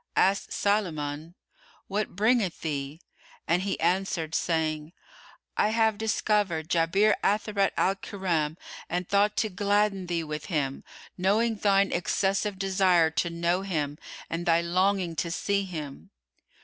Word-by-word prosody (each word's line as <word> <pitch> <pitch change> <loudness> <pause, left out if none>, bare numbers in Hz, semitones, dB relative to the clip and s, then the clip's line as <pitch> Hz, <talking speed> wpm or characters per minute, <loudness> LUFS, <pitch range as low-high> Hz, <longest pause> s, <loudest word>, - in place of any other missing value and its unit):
Asked 195 +1 +2
Sulayman, 165 -6 -1 0.5
"What 205 -1 -2
bringeth 215 -2 +1
thee?"; 145 0 -4 0.5
and 175 +2 +2
he 195 0 -2
answered, 175 -4 0
saying, 160 -1 -1 0.6
"I 210 - +2
have 220 -1 +2
discovered 210 -7 0
Jabir 185 +6 +3
Atharat 205 -1 +1
al 190 - +3
Kiram 170 -6 -2 0.3
and 180 +1 -2
thought 205 +1 +2
to 220 - +1
gladden 200 0 +1
thee 170 -1 -1
with 150 -1 -5
him, 145 -4 -2 0.4
knowing 220 +5 +2
thine 200 -1 +3
excessive 195 +3 0
desire 185 -4 +3
to 170 +2 0
know 170 +2 0
him 150 -6 -3 0.3
and 170 +1 -4
thy 165 0 +5
longing 180 0 +1
to 170 - -1
see 200 +3 0
him." 155 -6 -7
185 Hz, 130 wpm, -27 LUFS, 165-200 Hz, 0.6 s, thy